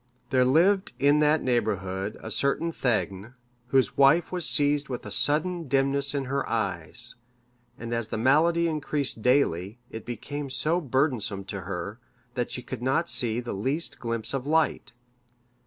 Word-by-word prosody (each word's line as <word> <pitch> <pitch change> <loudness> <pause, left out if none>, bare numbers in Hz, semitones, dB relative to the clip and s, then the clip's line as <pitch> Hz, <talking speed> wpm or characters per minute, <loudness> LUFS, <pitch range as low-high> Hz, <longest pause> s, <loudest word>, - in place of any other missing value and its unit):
There 130 -1 +4
lived 185 +9 +3
in 145 +2 +4
that 150 +1 +3
neighbourhood 105 -5 -1
a 110 - -6
certain 140 +8 0
thegn, 110 - -2 0.3
whose 130 0 +2
wife 140 +5 +5
was 180 -2 +4
seized 145 -1 +2
with 125 - -5
a - - -6
sudden 165 +3 +1
dimness 140 +1 +1
in 140 -1 -1
her 135 +1 -1
eyes, 110 +2 -2 0.6
and 120 0 -5
as 115 -2 -1
the 110 - -4
malady 160 +8 +3
increased 145 -6 -2
daily, 110 -6 +1
it 110 - -7
became 140 +4 -5
so 160 +6 +1
burdensome 125 - 0
to 100 0 -5
her, 100 +4 -5 0.3
that 120 -1 -2
she 125 - -5
could - - -7
not 145 +7 +1
see 115 -1 +1
the 120 -1 -5
least 135 - -2
glimpse 115 0 -3
of 135 0 -3
light. 160 -4 +1
130 Hz, 155 wpm, -26 LUFS, 115-150 Hz, 0.6 s, wife